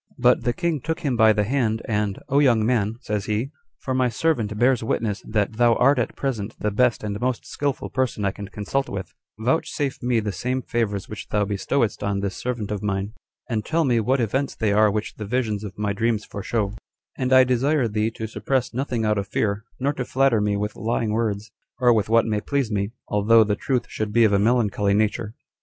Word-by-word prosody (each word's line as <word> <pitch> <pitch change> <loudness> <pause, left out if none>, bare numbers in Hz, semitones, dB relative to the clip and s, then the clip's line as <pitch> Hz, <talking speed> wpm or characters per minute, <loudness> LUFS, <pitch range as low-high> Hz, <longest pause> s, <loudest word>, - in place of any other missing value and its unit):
5. - - -35
But 125 0 +3
the 120 - +3
king 170 -4 -1
took 160 +4 -3
him 140 -6 0
by 110 -1 +6
the 105 -1 +2
hand; 115 -1 0
and, 105 -2 -1
"O 140 - +3
young 120 -6 +4
man," 110 -3 +1
says 105 -4 -2
he, 110 +6 -1 0.3
"for 130 - -4
my 130 -1 +2
servant 115 -5 0
bears 125 +1 +3
witness 110 -3 -1
that 105 0 -1
thou 120 -1 +4
art 135 +3 +4
at 120 - -2
present 115 -6 -3
the 105 - -1
best 125 +2 +2
and 105 +1 -4
most 125 -2 -1
skillful 140 -2 -3
person 130 -5 -1
I 95 - +2
can 100 +1 -8
consult 105 +8 -2
with; 95 -3 -6 0.3
vouchsafe 135 +3 -1
me 120 -1 +1
the 105 -2 -2
same 125 +5 -2
favors 105 -5 -2
which 105 - -8
thou 105 -1 +1
bestowedst 105 +4 -1
on 100 -1 -1
this 100 -1 -3
servant 120 -4 -3
of 105 -2 -2
mine, 100 0 -2 0.3
and 110 -3 -1
tell 165 +6 +1
me 120 -3 +3
what 130 +5 +1
events 130 +5 -1
they 105 -2 +1
are 105 +1 +5
which 105 +1 -3
the 105 - -5
visions 110 -3 -1
of 100 -2 -8
my 105 -1 -1
dreams 110 0 0
foreshow; 100 0 -2 0.4
and 130 -1 -2
I 130 0 +8
desire 130 +2 +2
thee 105 0 0
to 110 0 -6
suppress 125 +4 -1
nothing 125 -3 -1
out 105 -1 +2
of 100 - -4
fear, 100 +2 -1
nor 140 +3 +1
to 130 - -3
flatter 130 -3 +2
me 105 0 +1
with 105 +1 -3
lying 115 -1 -1
words, 110 -1 -1 0.3
or 125 -2 +4
with 110 -2 0
what 115 0 +4
may 105 -2 -1
please 140 -3 -1
me, 100 -1 0 0.2
although 110 +2 +5
the 105 -1 0
truth 125 +1 -1
should 110 -1 -4
be 115 +2 +4
of 105 -2 +4
a 100 - +4
melancholy 105 -3 +2
nature. 110 +1 0
110 Hz, 220 wpm, -23 LUFS, 105-125 Hz, 0.4 s, I